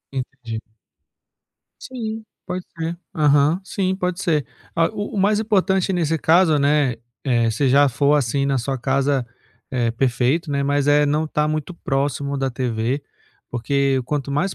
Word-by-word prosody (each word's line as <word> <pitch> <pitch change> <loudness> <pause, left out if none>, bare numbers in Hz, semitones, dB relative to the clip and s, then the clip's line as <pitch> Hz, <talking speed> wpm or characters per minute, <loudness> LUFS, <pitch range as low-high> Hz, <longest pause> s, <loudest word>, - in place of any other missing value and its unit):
Entendi. 125 -4 -5 1.2
Sim, 235 -4 -5 0.4
pode 180 0 -4
ser. 165 +1 -3 0.2
Aham, 150 +2 +3
sim, 190 -1 -1
pode 180 0 -2
ser. 155 -6 +1 0.3
Ah, 165 0 +3
o 205 0 -5
o - - 0
mais 210 +2 +3
importante 195 -3 +1
nesse 165 -2 0
caso, 160 -1 +4
né, 140 -3 +2 0.3
eh, 120 -3 +2
se 130 +5 +1
já 140 +2 +5
for, 140 +4 +2
assim, 140 -1 +1
na 135 -2 +1
sua 135 +2 -2
casa, 135 0 +1 0.4
eh, 120 -3 0
perfeito, 130 +6 0
né, 140 -1 0
mas, 145 0 +1
eh, 145 0 +4
não 150 +2 +1
estar 150 0 0
muito 155 +3 -2
próximo 140 -1 -1
da 135 -1 -1
TV, 120 +1 -2 0.5
porque 135 +2 +1
quanto 140 0 -2
mais 180 +7 0
145 Hz, 155 wpm, -21 LUFS, 135-165 Hz, 1.2 s, já